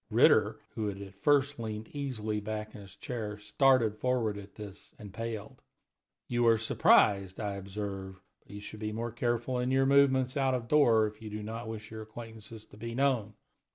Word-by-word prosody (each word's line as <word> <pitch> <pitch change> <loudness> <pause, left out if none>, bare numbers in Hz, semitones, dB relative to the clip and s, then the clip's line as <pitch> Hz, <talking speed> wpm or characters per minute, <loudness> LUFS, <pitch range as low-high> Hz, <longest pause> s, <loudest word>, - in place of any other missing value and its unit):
Ritter, - - +4
who 110 -2 -2
had 100 -1 -4
at 100 -1 -9
first 140 +5 +2
leaned 110 -1 -5
easily 115 -7 -3
back 110 +1 -5
in 105 - -9
his 100 -1 -13
chair, 105 0 -5
started 110 +1 +3
forward 125 -5 0
at 100 0 -10
this, 105 -2 -10
and 105 -6 -10
paled. 115 -2 -6 0.7
"You 120 -1 +2
are 115 -1 +6
surprised, 100 -3 +3
I 105 -2 -2
observe; 95 -1 -6 0.2
but - - -32
you 105 0 -8
should 105 +1 -9
be 105 0 -3
more 115 +1 -3
careful 120 +1 -1
in 125 +1 0
your 135 0 +3
movements 135 -2 +4
out 135 -2 +2
of 120 -2 -4
doors 115 -7 +4
if 105 - -24
you 110 - -7
do 105 0 -5
not 115 +2 -6
wish 110 -1 -7
your 110 0 -6
acquaintances 110 0 -10
to - - -17
be 115 +2 -6
known. 125 -6 +1
110 Hz, 190 wpm, -31 LUFS, 105-120 Hz, 0.7 s, are